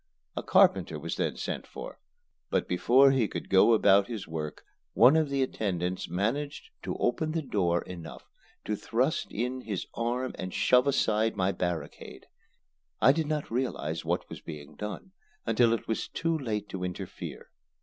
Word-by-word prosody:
A - - -2
carpenter - - +4
was - - -4
then - - -1
sent - - -4
for, - - -9 0.5
but - - 0
before 135 +3 +5
he 130 -5 +2
could - - -6
go 95 +4 +6
about 100 -2 +5
his 110 -5 -5
work 80 -2 -5 0.3
one 125 +6 +7
of 160 -2 +2
the 140 -1 +1
attendants 90 -8 -2
managed 120 - -2
to - - -4
open 155 +6 0
the 165 -1 -1
door 90 -9 +1
enough 85 -3 -9 0.4
to 105 - -1
thrust 130 +10 -1
in 125 +3 -2
his 105 -6 -4
arm 125 +2 -1
and 95 0 -5
shove 125 +2 +4
aside 110 -5 +2
my 95 -1 +1
barricade. 90 -2 -4 0.7
I 130 - +7
did 155 +1 -1
not 150 -4 -2
realize 125 +2 -2
what - - -1
was - - -9
being 75 -3 -9
done 105 - -6 0.3
until 115 0 +4
it 115 - -1
was 110 - -2
too 165 0 -1
late 110 -8 -3
to 95 -1 -5
interfere. 90 -1 -6
115 Hz, 165 wpm, -29 LUFS, 95-130 Hz, 0.7 s, one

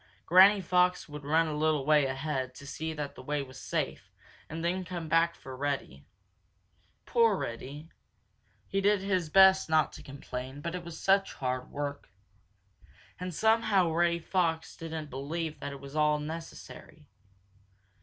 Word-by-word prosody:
Granny 190 +3 +7
Fox 180 0 +2
would 150 -1 -9
run 160 +3 +3
a 155 -2 -3
little 150 -2 +1
way 150 -2 +4
ahead 135 -1 -3
to 145 - -11
see 160 +3 -4
that 150 -2 -5
the - - -11
way 145 +1 -2
was 130 -1 -12
safe - - -3 0.4
and 165 +1 -4
then 185 +2 0
come 175 -2 -6
back 165 +1 +3
for 130 -1 -10
Reddy. 135 - -4 1.0
Poor 230 -4 +3
Reddy. 140 +6 -6 0.8
He 195 - -1
did 205 0 +3
his 185 -4 0
best 190 +1 +6
not 155 -2 +3
to - - -10
complain, 135 -1 -7
but 170 +3 -4
it 180 -1 -5
was 170 -1 -8
such 195 0 +2
hard 125 -1 -3
work. 145 0 -5 1.1
And 180 0 -4
somehow 220 -2 +3
Reddy 170 +1 +2
Fox 165 -2 -1
didn't 160 -2 -6
believe 155 +4 -4
that 140 - -5
it 140 - -8
was 140 +1 -10
at - - +1
all 150 0 +3
necessary. 160 +2 -9
160 Hz, 160 wpm, -30 LUFS, 140-180 Hz, 1.1 s, Granny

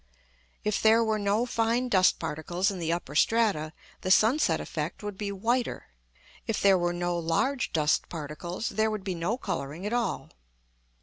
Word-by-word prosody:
If 210 -1 0
there 225 +1 +5
were 220 -1 0
no 205 +3 +1
fine 235 +1 0
dust 185 -6 +4
particles 170 +4 -2
in 190 - -6
the 165 -1 -1
upper 170 -4 -3
strata, 195 -3 +2 0.3
the 185 - -3
sunset 225 +10 +4
effect - - -5
would 205 -1 -4
be 200 +1 -4
whiter; 235 +5 -1 0.6
if 225 - -1
there 195 -1 +5
were 175 0 +1
no 175 0 -1
large 240 +11 0
dust 155 -2 +1
particles, 170 +6 -5
there 220 +2 +1
would 215 -2 -4
be 190 -2 -2
no 175 +7 -1
colouring 155 - -4
at 210 - -2
all. 235 -5 -2
200 Hz, 170 wpm, -28 LUFS, 170-225 Hz, 0.6 s, there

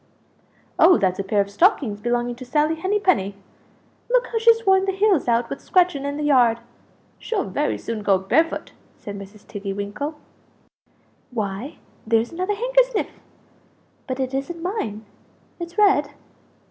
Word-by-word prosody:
"Oh, 365 - +7
that's 185 -2 0
a - - 0
pair 200 +1 +1
of 200 0 -4
stockings 250 - +2
belonging 240 +1 -1
to 255 - -8
Sally 300 +5 +1
Henny 380 +6 -1
penny 205 - +1 0.7
look - - +3
how 455 - 0
she's 455 0 +4
worn 385 0 +4
the 390 - +1
heels 385 -6 +2
out 235 0 +2
with 275 - -6
scratching 355 -7 +2
in 285 0 -3
the 300 - -3
yard! 250 -6 +4 0.6
She'll 415 -5 -2
very 295 - -1
soon 230 -2 -5
go 200 -2 +3
barefoot!" 315 - 0 0.3
said 205 - -8
Mrs. 200 +1 -11
Tiggy 200 -2 -5
winkle. 205 +10 -4 1.1
"Why, 215 +3 -4 0.3
there's 225 +1 +2
another 370 +4 -2
handkersniff - - +1 1.0
but 260 0 -4
it 260 0 -2
isn't 330 +5 -4
mine; 225 - -3 0.5
it's 345 +2 -7
red?" 395 -9 +4
280 Hz, 150 wpm, -22 LUFS, -, 1.1 s, Oh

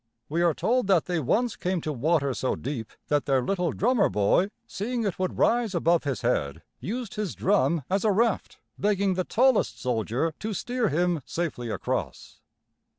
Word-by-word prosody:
We 165 +3 0
are 170 -2 +3
told 245 -2 +1
that 185 -5 +3
they 175 -2 -1
once 220 - +1
came 185 0 -1
to 155 - -3
water 140 +1 +1
so 130 - -1
deep 125 -5 -5 0.2
that 145 -1 +1
their 135 -2 +2
little 180 +1 0
drummer 235 0 +2
boy, 105 - +2 0.2
seeing 235 +4 -3
it 195 -4 -2
would 185 -1 -2
rise 230 -5 +2
above 170 -1 +2
his 140 -3 -2
head, 70 - -1 0.2
used 235 +2 -4
his 210 -5 -3
drum 170 -5 +2
as 195 +1 0
a 220 - +3
raft, 225 +1 0 0.2
begging 200 -1 +2
the 185 0 -1
tallest 255 +5 +2
soldier 125 +5 -1
to 215 -1 -3
steer 240 +2 -1
him 175 0 +1
safely 150 -9 -3
across. - - -4
180 Hz, 175 wpm, -26 LUFS, 145-210 Hz, 0.2 s, are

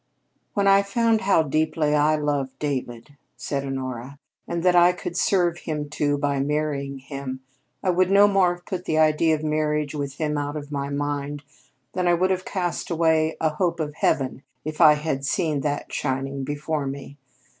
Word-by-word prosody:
"When 200 -2 +2
I 195 0 +6
found 225 +2 +1
how 190 -4 +3
deeply 155 0 0
I 150 +1 +3
loved 145 -3 -2
David," 135 -2 -4 0.2
said 140 -1 -3
Honora, 130 -1 -5 0.3
"and 170 0 -3
that 180 -1 +4
I 175 +1 +6
could 175 -1 -6
serve 175 -3 +2
him, 150 -2 -4
too, 145 -1 0
by 140 -1 0
marrying 140 -1 -1
him, 135 -1 -6 0.4
I 185 - +3
would 185 +1 +2
no 200 +1 +6
more 190 -3 +3
have 175 - -20
put 185 -1 -5
the 155 - 0
idea 155 +1 +4
of 155 - -6
marriage 150 -1 0
with 140 -2 -4
him 150 -1 -1
out 145 +1 -3
of 145 -1 -6
my 140 -1 -2
mind 145 0 -3 0.5
than 180 -1 0
I 175 - +5
would 185 +2 +1
have 185 0 -1
cast 180 -3 -3
away 160 -1 +2
a 160 - +2
hope 170 +1 0
of 150 -2 -2
heaven 135 -4 0 0.2
if 155 +2 -3
I 155 -2 +9
had 150 -3 -2
seen 155 -2 0
that 145 0 -3
shining 135 0 -2
before 145 +1 -2
me. 140 +1 -7
150 Hz, 185 wpm, -24 LUFS, 140-170 Hz, 0.5 s, I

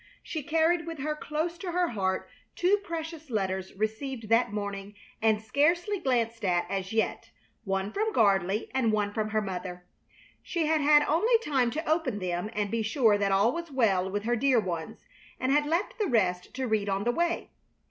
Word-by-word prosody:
She 315 - -4
carried 325 +3 +1
with 330 -1 -5
her 300 +2 -2
close 315 +3 -3
to 350 -1 -4
her 355 -1 +2
heart 190 -4 -1 0.3
two 375 +4 +3
precious 325 -4 -6
letters 190 -4 -2
received 220 +3 -3
that 230 -1 +3
morning 200 -1 -5 0.3
and 220 -1 +3
scarcely 340 - +1
glanced 235 -6 0
at 175 -2 +2
as 190 -1 -2
yet, 220 0 -1 0.4
one 195 +1 -1
from 435 +1 0
Gardley 200 - +2
and 255 -4 +2
one 205 -1 0
from 215 0 -1
her 215 0 0
mother. 180 -2 -6 0.6
She 335 -3 -1
had 310 0 +2
had 295 0 +6
only 430 +12 +3
time 275 - +1
to 315 +6 -4
open 310 -8 +1
them 180 +1 -2
and 205 -2 -1
be 230 0 0
sure 220 -2 +3
that 200 -1 +1
all 200 +4 +4
was 340 +2 -5
well 200 -8 +2
with 205 +1 -3
her 240 +2 +1
dear 255 0 +3
ones, 170 -6 -5 0.3
and 255 - 0
had 295 +1 +3
left 345 +9 -1
the 420 - +1
rest 185 - 0
to 260 0 -2
read 215 -3 0
on 195 +1 0
the 240 - +2
way. 345 +6 -1
230 Hz, 190 wpm, -28 LUFS, 200-315 Hz, 0.6 s, had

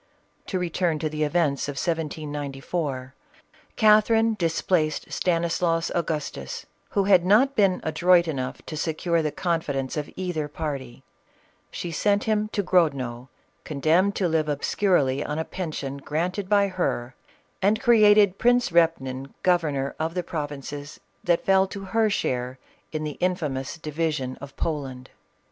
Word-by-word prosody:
To 190 - -1
return 175 -2 0
to 155 0 -2
the 155 0 -5
events 150 -3 +1
of - - -3
1794. 145 -3 -3 0.6
Catherine 220 +1 +4
dis 170 -6 -1
placed 155 -5 0
Stanislaus 170 -1 0
Agustus, 150 - -3 0.3
who 200 - +3
had 190 -3 +5
not 235 +9 +4
been 195 -3 +3
adroit 170 +2 +3
enough 130 -5 -4
to 155 - -6
secure 165 +2 0
the 155 -1 -1
confidence 145 -7 -2
of 150 -1 -3
either 175 -5 -2
party; 140 -5 -5 0.7
she 175 - -5
sent 200 +6 +1
him 215 -1 +1
to 205 - -1
Grodno, 135 -9 +1 0.3
condemned 160 +7 +2
to 185 - +1
live 160 -2 0
obscurely 145 -2 +1
on 150 - -3
a 160 - -2
pension 155 -6 -5
granted 175 +7 -3
by 200 -1 +4
her, 130 -9 -2 0.5
and 205 +3 +3
created 210 -6 +5
Prince 245 -3 +3
Repnin 140 -6 +1
governor 150 -7 +1
of 160 +2 -2
the 180 - -1
provinces 145 -2 -6 0.2
that 170 -1 +1
fell 190 0 +4
to 195 +1 -7
her 220 +3 +1
share 125 -9 -2 0.3
in 155 -1 -3
the 150 -1 -5
infamous 150 -7 -1
division 150 -4 -2
of 140 -1 -10
Poland. 135 -5 -4
165 Hz, 140 wpm, -25 LUFS, 145-185 Hz, 0.7 s, had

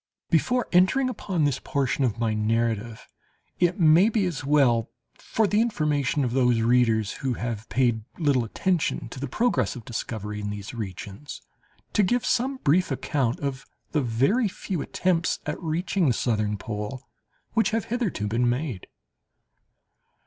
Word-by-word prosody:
Before 205 - +2
entering 190 +9 +4
upon 190 -8 -2
this 145 -3 +1
portion 135 -1 -1
of 115 -5 0
my 115 -2 0
narrative, 115 +1 -1 0.5
it 180 +1 +2
may 170 +5 +6
be 215 -3 +1
as 165 -6 -3
well, 135 -6 +3 0.2
for 220 - -1
the 205 +2 +2
information 150 - 0
of 125 - -1
those 125 -3 +3
readers 115 -3 +3
who 130 -3 -1
have 115 -2 -4
paid 120 -4 +1
little 145 -7 +2
attention 155 - -1
to 130 - -8
the 140 - -3
progress 135 - 0
of 120 -4 -9
discovery 105 -2 -4
in 105 - -3
these 105 +1 -6
regions, 105 +3 -7 0.5
to 210 - +4
give 240 +5 +1
some 260 +2 +1
brief 175 +6 +3
account 130 -2 -1
of 135 -1 -3 0.3
the 150 - +1
very 135 - +2
few 180 -3 -4
attempts 175 +1 0
at 150 +3 -4
reaching 170 +2 0
the 125 - +3
southern 105 -3 0
pole 105 +5 -5 0.5
which 225 -1 +3
have 225 -1 -1
hitherto 220 - -1
been 120 +3 +1
made. 125 - -3
135 Hz, 155 wpm, -25 LUFS, 115-180 Hz, 0.5 s, may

